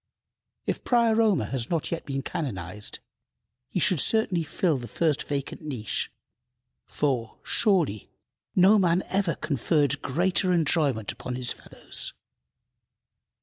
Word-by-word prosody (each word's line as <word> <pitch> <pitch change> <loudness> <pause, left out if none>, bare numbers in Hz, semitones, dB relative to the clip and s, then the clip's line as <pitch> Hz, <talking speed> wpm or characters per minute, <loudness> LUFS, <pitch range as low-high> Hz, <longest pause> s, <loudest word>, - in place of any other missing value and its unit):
If - - -2
Prior 230 -2 +3
Omer 215 -4 +3
has 125 -4 -3
not 165 -3 -1
yet 170 - -4
been 135 -1 -2
canonized, 105 - -4 0.7
he - - -1
should 180 -3 +3
certainly 200 - +3
fill 160 -1 0
the 120 - -7
first 150 +5 +1
vacant 140 -2 -4
niche, 130 -9 -2 0.8
for, 125 -6 -1
surely, 170 - +2 0.5
no 195 +3 +6
man 180 -1 +3
ever 190 -5 +1
conferred 145 0 +1
greater 180 +6 +1
enjoyment 145 - +1
upon 125 - -6
his 125 -1 +2
fellows. - - -6
155 Hz, 120 wpm, -26 LUFS, 130-185 Hz, 0.8 s, no